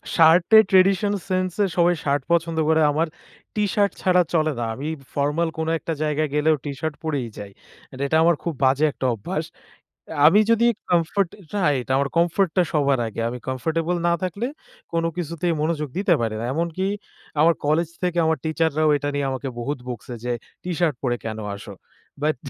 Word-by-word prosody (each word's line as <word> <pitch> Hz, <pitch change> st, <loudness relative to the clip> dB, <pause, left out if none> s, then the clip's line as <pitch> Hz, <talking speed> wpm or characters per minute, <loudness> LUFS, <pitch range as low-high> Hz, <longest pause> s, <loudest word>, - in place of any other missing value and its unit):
শার্টের 170 Hz, +7 st, +7 dB
tradition 195 Hz, +2 st, +4 dB, 0.2 s
sense 185 Hz, 0 st, 0 dB
এ, -, -, +4 dB
সবাই 175 Hz, 0 st, +4 dB
shirt 140 Hz, -1 st, +1 dB
পছন্দ 165 Hz, -1 st, +1 dB
করে, 160 Hz, 0 st, +4 dB
আমার 160 Hz, +3 st, +1 dB, 0.5 s
টিশার্ট 205 Hz, -1 st, +1 dB
ছাড়া 180 Hz, -1 st, +4 dB
চলে 155 Hz, -1 st, +2 dB
না। 115 Hz, -, -1 dB
আমি 140 Hz, +3 st, -5 dB, 0.3 s
ফরমাল 150 Hz, +4 st, 0 dB
কোন 160 Hz, 0 st, -2 dB
একটা 165 Hz, -, -3 dB
জায়গায় 155 Hz, 0 st, 0 dB
গেলেও 155 Hz, +1 st, +3 dB
টি 145 Hz, -, -4 dB
শার্ট 160 Hz, -2 st, -3 dB
পরেই 145 Hz, -6 st, -2 dB
যাই। 100 Hz, -1 st, -8 dB, 0.4 s
এট 130 Hz, -, -10 dB
এটা 160 Hz, +3 st, +2 dB
আমার 170 Hz, 0 st, +4 dB
খুব 170 Hz, -, -2 dB
বাজে 135 Hz, +3 st, +4 dB
একটা 135 Hz, -, -5 dB
অভ্যাস। 100 Hz, -, -4 dB, 0.8 s
আমি 190 Hz, +7 st, +6 dB
যদি 235 Hz, +1 st, +4 dB, 0.2 s
কমফোর্ট 175 Hz, +2 st, +2 dB, 0.3 s
রাইট। 145 Hz, -10 st, +1 dB
আমার 140 Hz, +1 st, +2 dB
কমফোর্ট 175 Hz, +2 st, +2 dB
টা 180 Hz, -, +6 dB
সবার 140 Hz, -4 st, +2 dB
আগে, 110 Hz, +1 st, -5 dB
আমি 125 Hz, +1 st, -6 dB
কমফোর্টেবল 160 Hz, +6 st, -1 dB
না 170 Hz, -, +3 dB
থাকলে, 200 Hz, +6 st, -2 dB, 0.5 s
কোন 165 Hz, 0 st, +1 dB
কিছুতেই 170 Hz, 0 st, -1 dB
মনোযোগ 155 Hz, -2 st, -1 dB
দিতে 195 Hz, -2 st, +3 dB
পারি 110 Hz, -2 st, -1 dB
না। 115 Hz, -, -3 dB
এমনকি 170 Hz, +4 st, -1 dB, 0.5 s
আমার 165 Hz, +3 st, +6 dB
কলেজ 155 Hz, +2 st, +1 dB
থেকে 180 Hz, -1 st, 0 dB
আমার 160 Hz, 0 st, +2 dB
টিচার 160 Hz, +1 st, +1 dB
রাও 155 Hz, 0 st, +3 dB
এটা 145 Hz, 0 st, -3 dB
নিয়ে 145 Hz, 0 st, -1 dB
আমাকে 130 Hz, +1 st, -4 dB
বহুত 140 Hz, +5 st, -3 dB
বকছে 125 Hz, 0 st, -6 dB
যে, 125 Hz, -, -2 dB, 0.3 s
"টিশার্ট 175 Hz, -4 st, 0 dB
পরে 120 Hz, -2 st, +1 dB
কেন 110 Hz, -1 st, -4 dB, 0.2 s
আসো?" 100 Hz, 0 st, -10 dB, 0.5 s
বাট 155 Hz, 0 st, +2 dB
160 Hz, 180 wpm, -23 LUFS, 145-175 Hz, 0.8 s, শার্টের